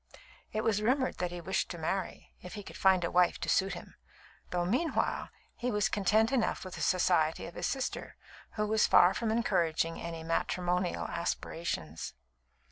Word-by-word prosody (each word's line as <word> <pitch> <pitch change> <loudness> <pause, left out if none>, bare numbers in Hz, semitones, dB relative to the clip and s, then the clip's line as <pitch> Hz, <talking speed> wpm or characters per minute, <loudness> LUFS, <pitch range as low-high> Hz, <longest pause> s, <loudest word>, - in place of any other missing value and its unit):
It 215 0 -1
was 210 -2 +2
rumoured 260 +4 +1
that 180 0 0
he 175 0 -6
wished 190 +3 -1
to 175 - -5
marry, 185 +4 -3
if 180 +4 -9
he 205 - -6
could - - -11
find 190 -2 +4
a 170 - -1
wife 180 -1 +3
to - - -3
suit 190 -1 +2
him, 175 - -10 0.6
though 175 -1 0
meanwhile 255 - 0 0.3
he 250 - -2
was 210 -2 +1
content 215 +3 +2
enough 245 -7 0
with 185 - -7
the - - -6
society 175 -3 +2
of 170 - -8
his - - -2
sister, 265 -2 -3 0.4
who 210 - 0
was 215 +1 +3
far 180 +2 +6
from 230 +2 -1
encouraging 165 -7 +1
any 165 -1 -5
matrimonial 180 +2 0
aspirations. 160 - -3
185 Hz, 175 wpm, -31 LUFS, 170-215 Hz, 0.6 s, far